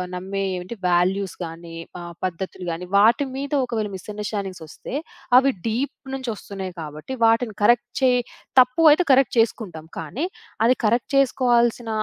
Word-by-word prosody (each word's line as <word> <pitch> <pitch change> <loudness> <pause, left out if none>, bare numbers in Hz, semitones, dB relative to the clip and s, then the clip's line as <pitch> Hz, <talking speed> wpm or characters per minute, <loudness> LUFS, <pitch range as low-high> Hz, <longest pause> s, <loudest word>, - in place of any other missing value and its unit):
నమ్మే 190 +2 -4 0.2
ఏంటి? 180 +6 -7
వాల్యూస్ 185 +2 +1
గాని 165 0 -9 0.2
ఆహ్, 170 0 -8
పద్ధతులు 185 +1 -5
గాని 170 +2 -5
వాటి 230 +7 +5
మీద 280 +2 -4
ఒకవేళ 220 -3 -2
మిసండర్‌స్టాండింగ్సొస్తే 200 -4 -6 0.4
అవి 275 +1 +5 0.2
డిప్ 240 +6 -1 0.2
నుంచోస్తున్నాయి 200 -7 -5
కాబట్టి 155 - -7
వాటిని 225 -1 +2
కరెక్ట్ 240 +3 +4
చేయి 250 -1 +4 0.4
తప్పు 250 +5 +1
అయితే 310 +5 +4
కరెక్ట్ 265 -1 +3
చేసుకుంటాం. 200 -8 -1
కానీ 165 - -3 0.4
అది 250 +2 +5
కరెక్ట్ 235 +5 +1
చేసుకోవాల్సిన 240 -3 +2
215 Hz, 130 wpm, -23 LUFS, 180-245 Hz, 0.4 s, వాటి